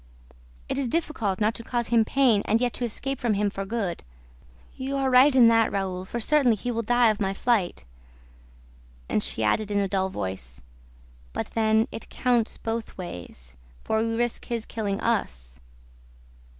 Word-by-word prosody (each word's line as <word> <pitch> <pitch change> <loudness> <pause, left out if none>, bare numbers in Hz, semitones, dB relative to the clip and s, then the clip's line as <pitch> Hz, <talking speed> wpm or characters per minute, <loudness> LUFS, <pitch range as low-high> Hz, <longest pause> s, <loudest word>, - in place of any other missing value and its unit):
"It - - -2
is 270 - -1
difficult 230 - -1
not 215 +1 +2
to 230 - -6
cause 240 0 -2
him 230 -1 +4
pain 240 -3 +3
and 225 - +2
yet 245 -1 0
to - - -3
escape 270 +4 -3
from 235 -4 +1
him 205 0 0
for 195 0 -4
good." 200 -5 -3 0.7
"You 270 +1 -4
are 270 -1 +1
right 260 +2 +6
in 245 -3 +8
that, 225 -1 +3
Raoul, 190 -2 -2
for 235 - -4
certainly 255 -1 +3
he 245 +4 -4
will 230 -1 -1
die 240 0 +4
of 215 - -5
my 195 -1 -1
flight." 200 - 0 1.2
And - - 0
she 110 - -1
added 210 - +1
in 205 - 0
a 200 -1 +1
dull 190 0 0
voice, 95 - -6 0.7
"But - - -4
then 220 0 +2
it - - -8
counts 240 -3 0
both 225 0 -4
ways... 85 - -9 0.3
for 220 0 0
we 225 0 -1
risk 240 0 -1
his 230 -2 -3
killing 205 -3 -3
us." 60 - -2
225 Hz, 175 wpm, -26 LUFS, 195-240 Hz, 1.2 s, in